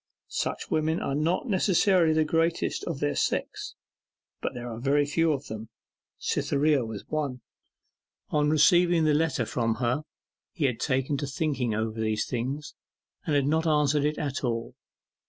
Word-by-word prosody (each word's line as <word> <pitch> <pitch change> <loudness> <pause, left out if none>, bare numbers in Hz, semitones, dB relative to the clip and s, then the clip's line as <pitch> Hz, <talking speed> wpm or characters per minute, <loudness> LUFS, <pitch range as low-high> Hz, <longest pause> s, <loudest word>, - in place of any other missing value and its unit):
Such - - -3
women 160 +2 +1
are - - -2
not 160 - 0
necessarily 185 -4 +3
the 155 0 +3
greatest 165 +2 0
of 160 -5 -4
their 145 - +1
sex, - - -2 0.7
but - - -3
there 120 0 -6
are 115 -1 -6
very 140 +3 +2
few 165 +3 +2
of 145 -1 -2
them. 110 0 -7 0.5
Cytherea 145 -1 +1
was 110 -3 -7
one. 145 -5 -2 0.9
On 150 -1 +2
receiving 170 +2 +4
the 155 -1 +3
letter 150 -5 +1
from 115 0 0
her 125 +4 0 0.5
he 155 - 0
had 125 -4 0
taken 135 +2 0
to 145 - -3
thinking 135 -5 -1
over 110 +1 -2
these 110 -1 0
things, 135 +4 -4 0.5
and 150 - +2
had 140 -1 +3
not 160 +3 +1
answered 150 -1 +3
it 150 +1 0
at 140 -2 -3
all. 115 -2 -2
145 Hz, 160 wpm, -27 LUFS, 125-155 Hz, 0.9 s, receiving